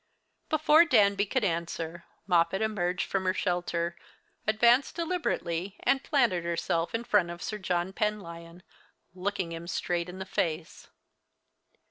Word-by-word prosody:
Before 310 +1 +6
Danby 205 -9 +3
could 260 +3 0
answer, 170 -1 -3 0.2
Moppet 180 +2 +2
emerged 180 -4 -1
from 190 -1 -2
her 185 0 +1
shelter, 175 -2 -1 0.5
advanced 235 +5 +4
deliberately, 205 - -2
and 270 0 +2
planted 235 - +2
herself 170 +1 -1
in 230 - -2
front 205 -7 +2
of 175 0 -7
Sir 215 - -4
John 180 0 -1
Penlyon, 175 -5 -4 0.5
looking 185 -1 -2
him 165 +1 -6
straight 175 0 -2
in 180 - -8
the 190 - -5
face. 170 -3 -3
185 Hz, 130 wpm, -29 LUFS, 170-215 Hz, 0.5 s, Before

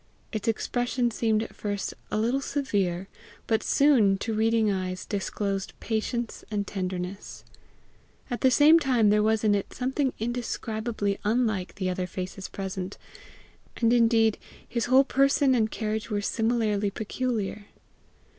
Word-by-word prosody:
Its 215 -1 -4
expression 245 +2 0
seemed 220 -1 +1
at - - -9
first 205 -1 -3 0.2
a - - -1
little 240 +5 +1
severe, 195 -11 -1 0.4
but 220 -1 +1
soon, 240 -9 +4
to 225 +3 -3
reading 220 0 +2
eyes, 185 -1 -3
disclosed 195 -1 -3
patience 230 +1 -3
and 205 -2 -1
tenderness. 185 0 -5 0.8
At 245 -3 -4
the 260 - +5
same 300 +5 +6
time 245 -8 +3
there 210 0 +4
was 220 0 +2
in 210 -1 +4
it 200 -1 0
a - - -14
something 265 +2 0
indescribably 220 -3 -2
unlike 215 -4 0
the 190 -2 -2
other 180 0 -2
faces 185 +1 -6
present 190 -1 -5 0.8
and 230 0 +3
indeed 225 -2 +4 0.3
his 235 -2 -1
whole 260 +2 +6
person 275 0 +3
and 220 -3 +2
carriage 215 0 -3
were 210 -2 0
similarly 220 -1 0
peculiar. 215 -1 -3
220 Hz, 140 wpm, -27 LUFS, 200-240 Hz, 0.8 s, same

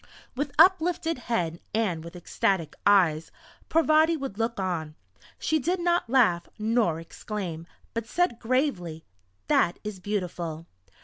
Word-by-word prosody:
With 285 +2 -2
uplifted 330 -2 +4
head 175 -10 -2 0.2
and 185 -8 0
with 170 +1 -10
ecstatic 175 -1 -1
eyes, 170 -6 +4 0.4
Parvati 320 0 +4
would 270 -8 -6
look 225 -1 -1
on. 165 -5 -3 0.4
She 315 - 0
did 355 +7 0
not 345 -6 +1
laugh 215 -10 +3
nor 215 -7 +1
exclaim, 170 -1 -6 0.3
but 230 -1 -3
said 350 -5 0
gravely: 225 - -1 0.4
"That 175 - +2
is 210 -3 -6
beautiful!" 175 -5 -4
210 Hz, 125 wpm, -27 LUFS, 170-280 Hz, 0.4 s, uplifted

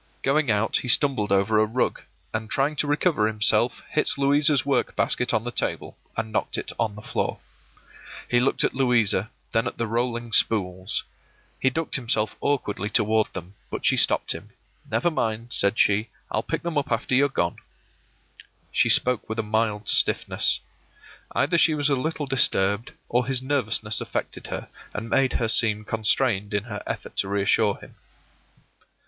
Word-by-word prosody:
Going 140 0 +1
out, 110 +1 +2
he - - -5
stumbled 125 -5 +2
over 100 +2 +3
a 110 - +4
rug, 120 +4 -1 0.3
and 110 0 -3
trying 140 +3 0
to 150 - 0
recover 145 -6 +2
himself, 110 -1 +2
hit - - +1
Louisa's 140 0 +3
work 135 -4 0
basket 125 - +1
on 110 - 0
the 120 - -4
table, - - -3 0.2
and 110 0 -3
knocked 105 - -1
it - - -4
on 110 -3 -1
the 105 - -11
floor. - - -2 0.9
He 120 - +2
looked 130 +2 +1
at - - +1
Louisa, 120 -6 +2 0.2
then 115 - +1
at - - -5
the 115 - -1
rolling 120 0 -2
spools; 95 -3 +1 0.6
he 130 - +3
ducked 160 +4 -2
himself 110 -4 0
awkwardly 105 -8 -1
toward 110 0 +2
them, 95 0 -8 0.2
but - - -5
she - - +4
stopped - - +3
him. - - -6 0.4
“Never 175 - +1
mind,” 115 -4 -2
said 100 0 +2
she; 105 +2 +2 0.2
“I'll - - 0
pick - - -4
them 170 -3 0
up 140 - -6
after 115 +2 -1
you're 140 +3 +4
gone.” 85 -10 -1 1.1
She - - +2
spoke 125 -3 +2
with 110 - -4
a 110 - 0
mild 105 -1 -1
stiffness. - - +2 0.7
Either 170 +4 +2
she 160 -2 +4
was 145 -1 +1
a - - +4
little 150 +3 -2
disturbed, 105 -5 +1
or 125 +1 0
his 130 -1 -1
nervousness 115 -6 0
affected - - -5
her, - - -5 0.3
and 115 +2 -5
made 135 -1 +2
her 115 - 0
seem 105 -2 +4
constrained 110 -2 +1
in 105 - 0
her 105 -3 -7
effort - - -6
to 95 - 0
reassure 100 0 +2
him. - - -15
115 Hz, 170 wpm, -24 LUFS, 105-135 Hz, 1.1 s, a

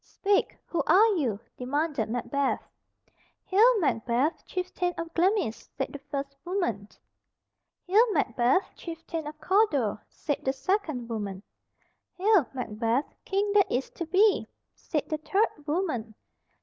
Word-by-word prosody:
"Speak, 400 0 0
who 335 - -1
are 410 +4 +7
you?" 240 - 0 0.2
demanded 275 -2 -1
Macbeth. 270 +4 -1 0.8
"Hail, 440 +4 +5
Macbeth, 250 - 0
chieftain 360 -1 -2
of 330 0 -5
Glamis," 360 - +1
said 270 - -2
the 285 - -6
first 275 -1 -4
woman. 290 - -2 1.0
"Hail, 435 +5 +4
Macbeth, 260 - +2
chieftain 330 -2 -6
of 305 0 -8
Cawdor," 300 - +2
said 290 -3 -3
the 265 - +1
second 280 - -1
woman. 205 -4 -4 0.7
"Hail, 380 - +4
Macbeth, 235 +1 -1
King 400 +1 0
that 405 -2 +4
is 255 +2 -1
to 340 - -5
be," 390 +5 +4 0.3
said 300 -3 -3
the 310 - -2
third 325 -3 0
woman. 290 - -1
305 Hz, 125 wpm, -28 LUFS, 250-375 Hz, 1.0 s, are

